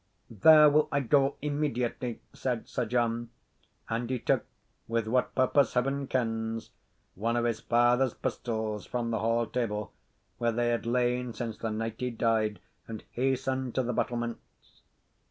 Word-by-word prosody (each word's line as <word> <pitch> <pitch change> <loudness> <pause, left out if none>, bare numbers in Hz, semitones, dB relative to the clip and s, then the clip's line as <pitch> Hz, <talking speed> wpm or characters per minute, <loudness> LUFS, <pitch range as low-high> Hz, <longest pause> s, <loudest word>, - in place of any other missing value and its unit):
"There 150 +8 +8
will 150 +1 +4
I 140 - +2
go 135 +2 +3
immediately," 125 -5 -2
said 125 -3 -3
Sir 125 - -2
John; 120 0 0 0.6
and 115 +1 -2
he 130 - 0
took - - +1 0.4
with 115 -1 0
what 125 +3 +1
purpose 130 0 +3
Heaven 135 +2 0
kens 115 -3 -2 0.4
one 115 +5 -1
of 120 0 +1
his 115 -2 0
father's 120 +2 +3
pistols 110 -4 -3
from 120 -1 -2
the 110 - 0
hall 115 +2 +1
table, 105 -3 -3 0.5
where 120 -1 +2
they 120 +1 0
had 120 0 -1
lain 125 0 0
since 115 -2 -5
the 115 - -2
night 110 +1 -3
he 125 - -1
died, 110 -3 0 0.3
and 110 -2 -7
hastened 130 0 -1
to 130 - +2
the 125 0 -2
battlements. 120 0 -4
120 Hz, 155 wpm, -29 LUFS, 115-125 Hz, 0.6 s, There